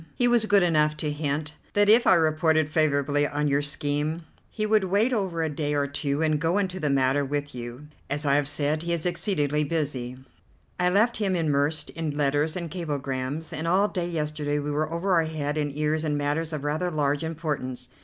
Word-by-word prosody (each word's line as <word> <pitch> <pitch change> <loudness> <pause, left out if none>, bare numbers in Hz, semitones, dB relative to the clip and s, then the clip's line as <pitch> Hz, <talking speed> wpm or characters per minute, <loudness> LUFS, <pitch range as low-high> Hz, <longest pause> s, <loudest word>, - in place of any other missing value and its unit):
He 245 - +3
was 240 -2 +3
good 205 -2 +5
enough 150 -3 +2
to 150 -1 -2
hint 150 0 -2 0.2
that 205 0 +3
if 225 +3 +6
I - - +7
reported 155 -1 +2
favourably 145 -2 +2
on 150 0 -1
your 140 0 +2
scheme, 145 +3 -2 0.3
he 215 - -3
would 215 -2 +3
wait 205 +7 +2
over 185 -7 -1
a - - 0
day 150 0 -2
or 145 -1 +1
two 140 +1 -1
and 155 -1 +1
go 165 +4 +1
into 190 -2 -1
the 150 -4 0
matter 135 +1 +2
with 145 +1 -3
you. 120 +3 -7 0.2
As 145 +1 -2
I 140 - +3
have 145 0 +2
said, 150 +1 -1
he 170 +1 -2
is 170 -1 -2
exceedingly 165 -4 0
busy. 140 -5 -3 0.6
I 180 0 +3
left 220 +6 +2
him 200 -3 0
immersed 150 -2 0
in 155 -3 -4
letters 145 +2 +1
and 170 -3 -5
cablegrams, 145 -3 -3
and 160 +2 -3
all 195 +4 +3
day 175 -3 -2
yesterday 150 -2 -2
we 145 0 -2
were 155 +2 -1
over 170 +1 +2
head 155 -2 -3
and 150 -2 -1
ears 155 +1 0
in 150 -2 0
matters 150 +3 -1
of 150 -3 -4
rather 155 +5 -1
large 145 -2 0
importance. 145 -6 -4
150 Hz, 205 wpm, -26 LUFS, 145-170 Hz, 0.6 s, I